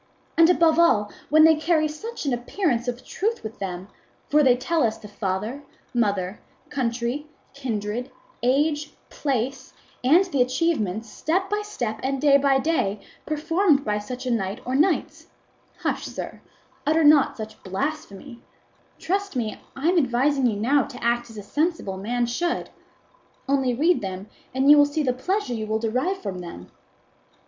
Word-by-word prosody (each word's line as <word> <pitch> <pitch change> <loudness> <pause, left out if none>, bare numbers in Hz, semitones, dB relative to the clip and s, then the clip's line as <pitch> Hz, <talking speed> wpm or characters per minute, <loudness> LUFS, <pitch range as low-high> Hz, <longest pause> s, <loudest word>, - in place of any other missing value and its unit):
And 330 0 +6
above 330 -2 +4
all 210 -12 +4 0.2
when 310 +1 +6
they 320 0 +8
carry 310 0 +2
such 375 +8 -7
an 275 - +1
appearance 245 - -1
of 245 +1 -4
truth 440 - -2
with 220 0 -7
them; 185 -1 -5 0.4
for 300 +1 +5
they 255 -3 +5
tell 325 +6 0
us 220 -2 +1
the 210 - -11
father, 210 +6 -3 0.3
mother, 200 -5 0 0.3
country, 250 +1 -2 0.3
kindred, 240 -2 -3 0.3
age, 295 +4 +1 0.2
place, 265 -1 -2 0.3
and 325 +10 +5
the 285 -8 0
achievements, 250 - 0
step 370 - -1
by 415 0 +1
step, 240 - -4
and 270 +1 -1
day 280 0 +6
by 275 -1 +3
day, 265 -9 0 0.3
performed 315 0 +2
by 210 0 0
such 250 +5 -7
a 250 - 0
knight 200 -1 -1
or 255 - -3
knights! 310 +6 +1 0.5
Hush, - - -1
sir; - - -7 0.4
utter 315 +2 +2
not 295 -2 +5
such 220 -1 -8
blasphemy; 235 +2 -5 0.6
trust 395 -1 -2
me 220 -4 -3
I 275 +4 -2
am 360 -1 +4
advising 265 0 +2
you 220 - 0
now 275 +6 +3
to - - -7
act 240 0 +1
as 225 - -12
a 205 - -6
sensible 295 - -1
man 240 +5 -1
should; 340 +9 -2 0.8
only 265 -3 +1
read 330 +7 +3
them, 190 +1 -6 0.2
and 265 +1 +1
you 295 - +8
will 290 - +6
see 295 +1 -1
the 255 -3 +1
pleasure 365 +2 -2
you 220 -2 -3
will 220 +1 0
derive 255 - -1
from 190 -3 -4
them. 170 - -9
260 Hz, 165 wpm, -24 LUFS, 225-310 Hz, 0.8 s, they